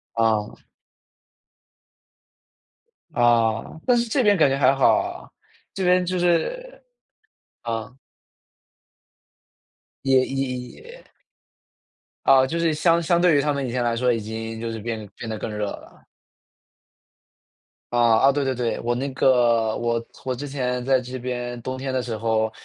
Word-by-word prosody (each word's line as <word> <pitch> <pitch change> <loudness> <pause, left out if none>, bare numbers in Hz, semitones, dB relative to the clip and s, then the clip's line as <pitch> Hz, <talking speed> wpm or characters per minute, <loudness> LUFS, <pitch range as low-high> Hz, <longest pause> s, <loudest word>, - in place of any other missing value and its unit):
啊。 110 -2 0 2.6
啊， 115 +2 +1
但 250 - +4
是 235 0 0
这 255 +2 +1
边 205 -1 +5
感 145 -4 +4
觉 135 - 0
还 135 0 +4
好 135 - +4
啊， - - -7 0.4
这 195 - -3
边 180 0 +3
就 185 +1 -2
是 - - -1 0.8
啊。 115 +1 -5 2.1
也 130 -1 +4
也 135 -1 -2
也 480 +2 -14 1.2
啊， 135 -1 +6
就 165 +6 -3
是 165 -2 +1
相 165 +2 +2
相 170 +1 +2
对 175 -3 +4
于 - - +3
它 145 +1 0
们 140 -1 -2
以 125 - -4
前 125 0 -1
来 120 -1 0
说 125 +1 +2
已 115 - 0
经 110 +1 -6
就 115 0 -4
是 115 - -5
变 110 -1 -5
变 115 - -7
得 110 - -4
更 110 - -5
热 105 0 -2
了。 - - -10 1.9
啊， 120 - +1 0.3
啊， 140 - +6
对 145 0 0
对 135 - 0
对， 120 -2 -2
我 120 +1 0
那 130 +3 -2
个 120 -4 +3
我 115 0 -1 0.2
我 130 -1 -1
之 145 - -6
前 125 -3 -2
在 130 0 +3
这 125 +1 -7
边 120 -1 -4
冬 130 +2 -5
天 130 0 -4
的 130 - 0
时 115 -3 -4
候， 110 0 0
125 Hz, 165 characters per minute, -23 LUFS, 115-145 Hz, 2.6 s, 啊